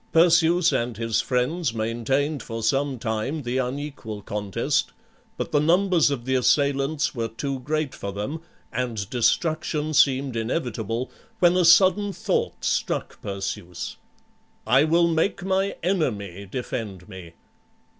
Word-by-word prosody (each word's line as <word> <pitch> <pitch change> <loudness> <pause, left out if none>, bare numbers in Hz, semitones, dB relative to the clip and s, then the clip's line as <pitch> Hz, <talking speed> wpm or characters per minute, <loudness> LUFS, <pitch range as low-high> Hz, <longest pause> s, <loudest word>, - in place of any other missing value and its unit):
Perseus 170 +1 +5
and 120 -2 -1
his 115 -1 0
friends 130 +2 -1
maintained 125 +6 -1
for 115 -1 -6
some 135 +3 +1
time 115 +6 -2
the 125 +2 -1
unequal 130 -5 -4
contest; 100 -2 -1 0.4
but - - -4
the 150 - +3
numbers 175 +1 +3
of 130 -4 -3
the 130 - 0
assailants 140 +3 +2
were 115 -4 -2
too 130 +5 -4
great 150 +1 -2
for 100 - -5
them, 105 +11 -4 0.3
and 115 -5 -2
destruction 155 +4 0
seemed 135 -2 +3
inevitable, 115 - -2 0.3
when 175 0 +4
a 185 - +3
sudden 190 +4 +5
thought - - -2
struck - - -1
Perseus, 95 -2 -5 0.7
"I 135 +6 +5
will 170 +2 +4
make 170 +3 0
my 195 +1 0
enemy 100 - -1
defend 105 -5 -5
me." 95 -5 -10
130 Hz, 130 wpm, -24 LUFS, 115-160 Hz, 0.7 s, Perseus